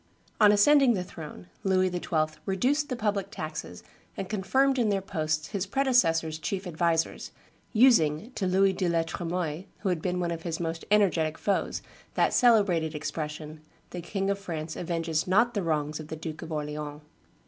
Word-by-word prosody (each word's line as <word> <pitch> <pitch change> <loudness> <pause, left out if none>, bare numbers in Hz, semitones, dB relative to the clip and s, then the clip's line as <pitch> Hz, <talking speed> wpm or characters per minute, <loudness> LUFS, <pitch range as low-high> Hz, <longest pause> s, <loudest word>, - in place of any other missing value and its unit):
On 210 -2 +7
ascending 250 +4 +5
the 180 - -2
throne 150 - -10 0.2
Louis 185 -1 +2
XII. 155 -3 -1
reduced 265 +10 +1
the 255 - -1
public 210 -4 -1
taxes 155 - -6 0.3
and 195 - -3
confirmed 265 +7 +1
in 225 -3 +2
their 200 -1 +1
posts 155 -4 -2
his 200 -2 -3
predecessor's 175 - +2
chief 190 +5 -3
advisers, 170 -1 0 0.4
using 215 - +4
to 195 -7 -2
Louis 190 +1 +3
de 185 -1 0
la 165 -1 +2
Tremoille, 170 0 -3 0.2
who 200 - 0
had 175 -3 -1
been 180 0 -1
one 175 -1 -1
of 165 -1 -4
his 165 -1 -4
most 165 -1 -3
energetic 175 -7 +2
foes, 200 - -1 0.3
that - - +2
celebrated 200 - +3
expression, 155 0 -5 0.3
"The 175 - -5
King 195 +3 -1
of 200 - -2
France 160 -5 -5
avenges 165 -2 -2
not 230 +6 +3
the 205 - -1
wrongs 155 -2 -1
of 155 - -8
the 160 - -5
Duke 155 0 -7
of 160 - -8
Orleans." 150 -1 -4
175 Hz, 170 wpm, -28 LUFS, 155-200 Hz, 0.4 s, On